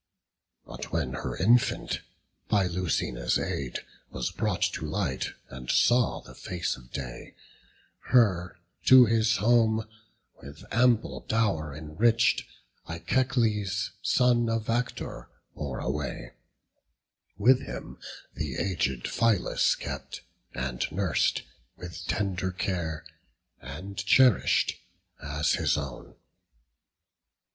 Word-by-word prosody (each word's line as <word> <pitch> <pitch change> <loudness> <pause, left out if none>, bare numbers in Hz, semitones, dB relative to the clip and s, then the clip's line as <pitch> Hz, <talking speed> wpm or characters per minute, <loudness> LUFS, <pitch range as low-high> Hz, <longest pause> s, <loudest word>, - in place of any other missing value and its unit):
But - - -8
when 75 -5 -1
her 65 -1 -4
infant, 110 +4 +2 0.5
by 100 -2 +3
Lucina's 90 -9 0
aid, 65 -3 -3 0.3
Was 60 -1 -3
brought - - -1
to - - -4
light, 80 -4 -2 0.2
and 65 -1 -9
saw 120 -1 +3
the - - -14
face 90 -2 -3
of - - -16
day, 65 -3 -7 0.7
Her 95 -9 +3 0.3
to 130 -1 +9
his 110 0 +2
home, 110 0 +3 0.5
with 70 +3 -11
ample 120 -1 +2
dow'r 95 -10 0
enrich'd, 110 +10 +2 0.4
Echecles, 105 +1 0
son 120 -2 +3
of 115 0 -1
Actor, 115 - -3 0.2
bore 70 -4 -5
away; 70 +1 -4 1.0
While 125 +5 +6
him 60 - -8 0.3
the 75 -5 -4
aged 70 -10 -1
Phylas 115 -5 +2
kept, - - -6 0.3
and 65 -1 -2
nurs'd - - +1 0.3
With 90 +1 -8
tender 95 -3 -1
care, 85 -4 -3 0.5
and 85 +10 -8
cherish'd—as 80 - +2
his - - +1
own. 70 -4 -6
95 Hz, 100 wpm, -28 LUFS, 70-115 Hz, 1.0 s, to